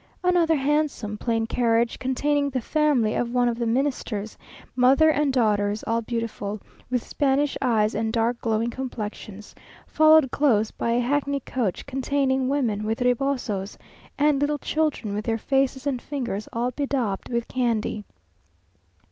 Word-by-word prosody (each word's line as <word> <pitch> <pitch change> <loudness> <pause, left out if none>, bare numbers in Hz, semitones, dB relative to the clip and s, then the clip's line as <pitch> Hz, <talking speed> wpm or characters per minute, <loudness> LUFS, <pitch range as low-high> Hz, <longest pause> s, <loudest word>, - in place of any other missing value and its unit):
Another 350 -3 +3
handsome, 285 -6 0
plain 225 +1 -1
carriage, 230 0 +1
containing 285 +2 0
the 260 -1 -2
family 275 -4 +1
of 240 -1 -1
one 245 -1 +3
of 235 0 -1
the 235 - 0
Ministers; 230 -4 -2 0.4
mother 270 +5 +5
and 295 -2 +1
daughters 210 -4 +1
all 230 +1 0
beautiful, 220 -3 -4 0.3
with 250 -2 -2
Spanish 285 0 +1
eyes 220 -4 +2
and 220 +1 -1
dark 235 +1 0
glowing 225 +1 0
complexions, 215 -5 -7 0.3
followed 310 -4 +5
close 225 -7 +2
by 235 - -1
a 240 - +2
hackney 280 +2 0
coach 235 -7 -3
containing 265 -1 0
women 235 -7 0
with 220 +3 -2
rebosos, 245 -6 -1 0.4
and 290 -1 +2
little 295 +1 +1
children, 300 -9 -1
with 210 +1 -3
their 225 -1 0
faces 270 +2 0
and 265 -4 -1
fingers 240 -8 -4
all 240 +2 -1
bedaubed 250 -7 -2
with 235 -1 -2
candy.... 230 -4 -1
245 Hz, 145 wpm, -24 LUFS, 225-280 Hz, 0.4 s, mother